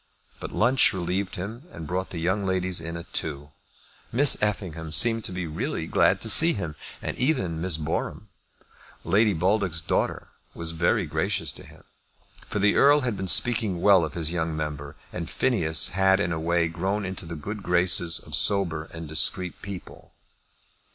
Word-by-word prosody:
But - - -7
lunch 125 +4 +3
relieved 95 +2 -3
him, 110 - -7
and 80 - -9
brought 90 +4 -3
the 90 - -7
young 95 +5 -1
ladies 95 -2 -1
in 85 +1 -6
at 85 - -11
two. 75 -2 -5 0.6
Miss 135 +4 +6
Effingham 90 -6 -3
seemed 115 +6 +3
to - - -2
be 90 -1 -4
really 80 -1 -4
glad - - +2
to 110 - -1
see 165 +9 +8
him, 85 -7 -5 0.3
and - - -4
even 95 - 0
Miss 90 -3 0
Boreham, 80 +6 -4 0.8
Lady 105 +1 +2
Baldock's 95 0 0
daughter, - - -2 0.3
was 85 -1 -2
very 85 +1 0
gracious - - -2
to - - -11
him. - - -17 0.6
For - - -4
the 105 +1 +3
Earl 145 +1 +5
had 120 -4 -2
been 95 -1 -5
speaking 110 -3 +3
well 95 -1 +5
of 80 -2 -5
his 80 -2 -1
young 80 -2 -2
member, 75 -2 -5 0.2
and 85 -2 -5
Phineas 85 -11 +2
had 95 +1 +2
in 85 -4 -1
a 80 - -2
way 85 +1 +1
grown 95 +5 -3
into 95 -2 -6
the 85 - -6
good 100 +8 -7
graces 90 -2 +2
of - - -10
sober 85 -6 +2
and 80 0 -9
discreet 80 +5 0
people. 100 -2 -10
90 Hz, 175 wpm, -25 LUFS, 80-100 Hz, 0.8 s, see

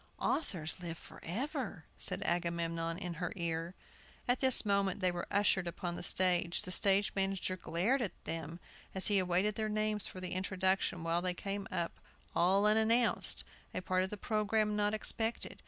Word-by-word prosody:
"Authors 180 - -1
live 170 -2 -5
forever!" 240 - -5
said 185 +2 -2
Agamemnon 170 -1 -1
in 180 -2 -4
her 175 - -1
ear. 170 0 -2 0.5
At 245 +1 +3
this 260 -4 +5
moment 200 -1 +2
they 185 -2 +2
were 175 0 -4
ushered 195 -3 +2
upon 175 0 -3
the - - -5
stage. 175 -1 +2
The 180 - -5
stage 200 +1 +3
manager 195 -1 0
glared 185 +10 0
at 210 - -4
them, 165 +1 -5 0.4
as 190 - +2
he 205 -1 +4
awaited 185 +3 +2
their 215 0 -2
names 215 -1 +1
for - - -10
introduction, 185 -1 0
while 165 +1 +1
they 180 0 0
came 200 +1 -4
up 170 - -2 0.4
all 190 +4 +4
unannounced, 220 +3 +3 0.3
a 185 - -1
part 185 0 +1
of 190 - -2
the 210 - -5
programme 215 0 +1
not 210 0 +1
expected. 225 +1 -2
190 Hz, 165 wpm, -34 LUFS, 175-210 Hz, 0.5 s, this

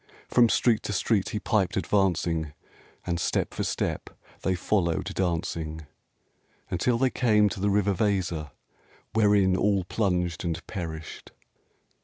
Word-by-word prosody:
From 120 -2 +4
street 115 -1 +3
to 105 - -2
street 100 0 +1
he 105 - -3
piped 105 -3 0
advancing, 85 -6 0 0.5
And 85 -1 -1
step - - -1
for - - -2
step - - -2 0.3
they 95 - 0
followed 90 -1 0
dancing, 80 -4 -2 0.9
Until 115 +7 +1
they 130 +1 +2
came 105 -4 +3
to 95 - -6
the 100 +2 +1
river 100 0 +2
Weser, 90 -6 -1 0.6
Wherein 105 -4 +4
all 100 0 +2
plunged 90 -4 -1
and 80 -1 -3
perished! 80 -5 -7
95 Hz, 130 wpm, -27 LUFS, 85-105 Hz, 0.9 s, From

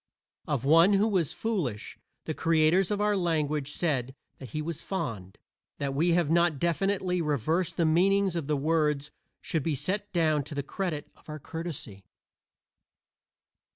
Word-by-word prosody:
Of 135 -4 -1
one 165 +7 +6
who 200 +2 +3
was 180 -8 +1
"foolish" 175 - -3 0.3
the 155 - -2
creators 165 +4 +3
of 205 -1 -1
our 210 0 +2
language 155 -5 0
said 135 -6 -1 0.2
that 130 - -9
he 155 - -4
was 160 0 -4
"fond." 110 - -5 0.4
That 140 -1 -2
we 165 +5 +2
have 170 -3 +2
not 170 -2 +3
definitely 180 +3 0
reversed 160 +4 0
the 170 - +2
meanings 190 +3 +3
of 165 -5 -3
the 150 -1 +1
words 150 -1 0 0.3
should 160 - -1
be 155 +1 -1
set 195 +9 -2
down 155 -4 +2
to 150 - -7
the 140 - -2
credit 165 -1 -3
of - - -20
our 155 - -5
courtesy. 150 - -6
160 Hz, 155 wpm, -28 LUFS, 145-180 Hz, 0.4 s, one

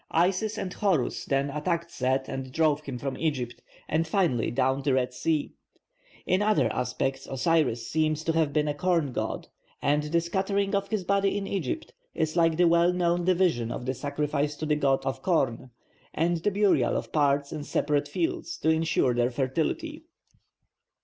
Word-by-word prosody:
Isis 190 +6 +1
and 185 -3 -4
Horus 185 - 0
then 140 +1 0
attacked 170 +3 -2
Set 130 -2 0
and 130 -1 -5
drove 155 0 +2
him 135 -4 -6
from 135 +1 -4
Egypt, 130 -7 -2 0.3
and 160 +1 0
finally 160 - +1
down 130 +3 +1
the 135 -1 +1
Red 125 -1 0
Sea. 155 +3 -1 0.7
In 185 +2 +2
other 215 0 +2
aspects 125 +2 -2
Osiris 135 -5 +1
seems 155 0 0
to 165 - +1
have 160 -3 +2
been 150 +1 +1
a 145 - 0
corn 165 -2 +1
god, - - -3 0.3
and 145 +1 +2
the 150 +3 +1
scattering 195 +4 -1
of 200 0 0
his 215 -4 -1
body 200 +1 +1
in 200 - -3
Egypt 190 -10 -3 0.2
is 160 0 -1
like 165 -2 +3
the 175 0 +5
well 170 +1 +4
known 175 -1 +1
division 175 -11 +2
of 125 - -5
the 130 - -1
sacrifice 145 +1 -2
to 155 - -4
the 150 -1 +2
corn 135 -2 0
god, 135 -9 0 0.5
and 170 +2 +1
the 170 +5 0
burial 205 0 +2
of - - -5
parts 140 -1 +2
in 155 -2 -5
separate 145 0 0
fields 340 0 -2
to 160 - 0
ensure 160 -5 +2
their 120 0 +2
fertility. 160 - -2
155 Hz, 175 wpm, -27 LUFS, 135-180 Hz, 0.7 s, the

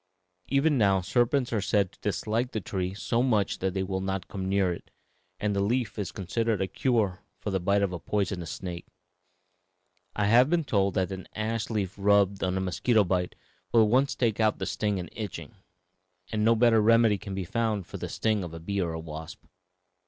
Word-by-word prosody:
Even 140 0 +2
now 100 -3 +4
serpents 120 +6 +1
are 110 - +1
said 100 -2 +1
to - - -24
dislike 115 +4 -1
the 110 - -1
tree 95 -1 -3
so 115 +3 0
much 110 -6 +1
that 95 0 -1
they 95 - 0
will 95 0 -2
not 95 -1 -3
come 95 -2 -4
near 95 -2 +2
it, - - -11 0.5
and 105 -1 0
the - - +1
leaf 115 +3 0
is 100 -4 -3
considered 110 +2 -1
a 95 - +1
cure 105 -1 0 0.2
for 105 - -4
the 95 - 0
bite 100 +3 +2
of 95 -2 0
a 90 - -4
poisonous 95 -3 -2
snake. 90 0 -6 1.3
I 105 - +1
have 120 +6 +5
been 170 -1 +2
told 100 -7 +1
that 95 0 0
an 95 -1 -6
ash 110 0 -2
leaf 100 -4 -2
rubbed 100 -1 +3
on 95 0 0
a - - 0
mosquito 105 +5 +2
bite 90 -1 -1 0.4
will 115 -1 +6
at 105 - +2
once 130 +4 +2
take 115 -4 0
out 110 -1 +3
the - - -3
sting 105 -2 -1
and 90 - -5
itching, 105 -5 -6 0.8
and 105 -1 0
no 115 +1 +5
better 115 -1 +4
remedy 115 -2 +4
can 95 0 -6
be 95 -2 -3
found 110 -1 -1
for - - -8
the - - -5
sting 110 -3 0
of 85 -2 -7
a - - -7
bee 100 +4 -2
or 85 -2 -2
a 80 - -4
wasp." 80 0 -8
100 Hz, 210 wpm, -28 LUFS, 95-115 Hz, 1.3 s, will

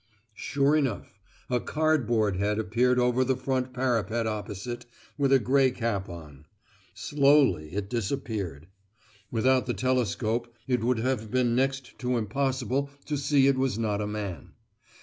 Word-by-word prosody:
Sure 140 +6 +1
enough, 125 -8 -2 0.3
a 125 -3 +1
cardboard 120 -10 +1
head 105 +2 0
appeared 120 +4 +2
over 125 +1 +3
the 130 0 0
front 130 -1 -1
parapet 120 -3 0
opposite, 110 +3 -5 0.3
with 140 -2 +1
a 135 - +7
grey 135 +1 +3
cap 115 -6 -2
on. 75 -3 -11 0.5
Slowly 135 - +3
it 100 -1 -2
disappeared. 105 - -3 0.6
Without 130 +2 +2
the 120 - -1
telescope 120 0 0
it 125 -3 0
would 125 0 +2
have 115 -2 -1
been 125 -1 +1
next 135 0 -1
to 125 -1 0
impossible 130 +3 -1 0.2
to 150 - -2
see 140 -1 +3
it 135 -1 +3
was 130 -5 0
not 105 -2 -1
a 105 - -2
man. 105 -4 -5
125 Hz, 145 wpm, -27 LUFS, 105-130 Hz, 0.6 s, a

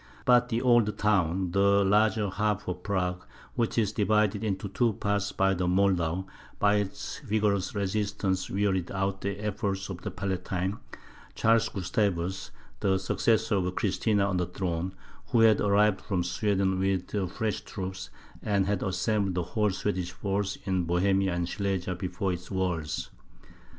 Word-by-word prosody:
But 125 0 +5
the 115 +1 -1
old 120 -4 +3
town, 95 -3 +1
the 100 +1 +4
larger 105 +1 +3
half 105 +1 -1
of 90 0 -4
Prague, 90 -2 -1 0.3
which 115 0 -1
is 110 -4 +2
divided 105 0 +1
into 100 -2 -2
two 115 +3 +1
parts 100 0 -1
by 95 0 +2
the 90 -1 -1
Moldau, 90 -2 +1 0.3
by 105 0 +3
its 100 -2 -4
vigorous 105 -7 0
resistance 100 -1 -1
wearied 95 -3 0
out 95 0 -2
the 100 0 -2
efforts 100 -2 -2
of 95 -2 -6
the - - -4
Palatine, 95 0 -2 0.6
Charles 115 0 +3
Gustavus, 95 -1 -1 0.3
the 95 -1 +2
successor 110 +3 +1
of 90 -1 -1
Christina 105 0 +1
on 100 -2 0
the 90 -1 0
throne, 90 0 -3 0.3
who 120 -4 +3
had 110 -2 +5
arrived 105 0 +3
from 95 -3 -1
Sweden 95 0 0
with 95 -1 0 0.2
fresh 110 +3 -2
troops, 95 - -6 0.3
and 100 -2 +1
had 100 -1 0
assembled 100 0 0
the 90 - 0
whole 105 0 +2
Swedish 95 -2 -2
force 100 0 -2
in 95 -2 0
Bohemia 95 +3 +2
and 85 -1 -1
Silesia 95 -2 -2
before 90 +1 -2
its 90 0 -7
walls. 90 -5 -2
100 Hz, 150 wpm, -28 LUFS, 95-105 Hz, 0.6 s, But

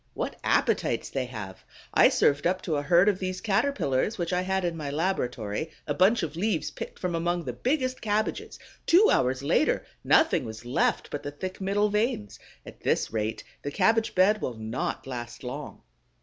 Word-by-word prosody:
What - - -4
appetites - - +1
they 135 -2 -1
have! 105 -6 -8 0.3
I - - +7
served 145 +2 +2
up 185 +1 -1
to 155 -4 -1
a - - 0
herd 170 +6 +4
of 200 -3 +2
these 185 -1 -3
Caterpillars 205 - 0
which 175 -1 -2
I 180 - +2
had 190 0 -1
in 170 -1 -1
my 150 -3 -4
laboratory 140 - -2 0.2
a 145 - -1
bunch 190 +8 +3
of 165 - -4
leaves 195 -1 -1
picked - - -7
from 180 -1 -2
among 175 +1 0
the - - -4
biggest 255 -1 -1
cabbages: 215 0 -1 0.3
two 380 +6 +6
hours 130 +1 +1
later - - +2 0.2
nothing - - +4
was 110 +1 -8
left 120 - 0
but 145 - -3
the - - -5
thick 185 +7 -6
middle 205 +2 +1
veins. 210 - -1 0.3
At - - -12
this - - 0
rate 110 0 -2 0.2
the 145 - -3
cabbage 225 +9 +2
bed 200 +3 +4
will 125 - -3
not 110 +3 -4
last 120 -2 -7
long. 135 +3 -7
170 Hz, 185 wpm, -27 LUFS, 130-200 Hz, 0.3 s, I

